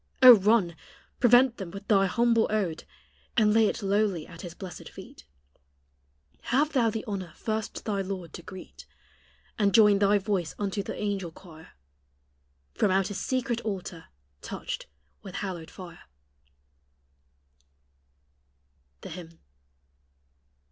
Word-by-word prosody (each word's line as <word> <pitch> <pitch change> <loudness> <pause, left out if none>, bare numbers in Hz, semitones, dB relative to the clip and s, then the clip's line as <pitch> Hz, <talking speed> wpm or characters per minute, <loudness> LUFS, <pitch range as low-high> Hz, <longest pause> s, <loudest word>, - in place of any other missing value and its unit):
Oh! 250 -1 +13
run, 200 -4 +2 0.4
prevent 245 0 +5
them 195 -4 -6
with 200 +3 -10
thy 195 -2 +4
humble 230 +2 +2
ode, 190 -7 -1 0.5
And 210 -2 +4
lay 220 -1 +5
it 220 - -3
lowly 195 -4 +1
at 170 -1 -12
His 175 -2 -8
blessed 180 -6 -9
feet; - - -13 1.2
Have 295 +5 +1
thou 240 -5 +3
the 220 0 -4
honor 190 -6 -5
first 220 -1 -4
thy 200 -3 -1
Lord 185 -3 -6
to - - -8
greet, 185 +2 -11 0.7
And 200 -2 +3
join 210 -3 +6
thy 205 0 +4
voice 190 -4 -2
unto 200 0 -2
the - - -6
angel 200 -4 -2
choir, 160 -2 -15 1.0
From - - +1
out 190 0 +2
His 205 - -4
secret 250 -2 -1
altar 190 -5 -5 0.4
touched - - -6 0.3
with 190 -2 -10
hallowed 180 -5 -5
fire. 175 -2 -11 3.0
THE - - -8
HYMN. 165 -1 -10
200 Hz, 125 wpm, -27 LUFS, 180-220 Hz, 3.0 s, Oh